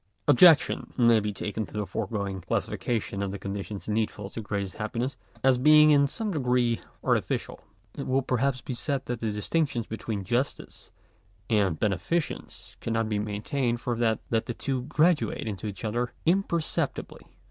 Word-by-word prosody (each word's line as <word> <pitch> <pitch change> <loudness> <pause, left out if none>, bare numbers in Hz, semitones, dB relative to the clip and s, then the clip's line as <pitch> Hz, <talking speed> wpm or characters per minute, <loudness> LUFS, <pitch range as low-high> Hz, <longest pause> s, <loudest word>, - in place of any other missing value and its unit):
§8. - - -49 0.3
Objection 160 +2 +6
may 120 -3 +5
be 105 0 -2
taken 105 +2 -3
to - - -11
the 105 -1 -1
foregoing 100 -1 -3
classification 105 +1 -2
of 100 - -1
the 100 - -4
conditions 100 +1 -5
needful 105 -2 -2
to 115 - -5
greatest 100 -3 -4
happiness, 115 +5 -2 0.3
as 130 -1 +4
being 150 +2 +7
in 140 -1 +5
some 215 +8 -3
degree 125 -6 +1 0.2
artificial. - - 0 0.3
It - - -6
will 130 +1 +2
perhaps 130 +1 0
be 130 - -5
said 135 +2 -2
that 120 -1 -3
the 115 - -1
distinction 120 +3 -1
between 110 -2 -4
justice 120 +8 -3 0.6
and 100 -7 +2
beneficence 110 - -2
cannot 115 -1 -1
be 105 -1 0
maintained, 115 +4 -1
for 120 0 -2
that 115 -2 +2
the 115 +1 0
two 130 -2 -2
graduate 150 - +2
into 105 0 -4
each 100 +1 -6
other 120 +3 -1
imperceptibly. 170 -2 0
115 Hz, 160 wpm, -27 LUFS, 105-135 Hz, 0.6 s, being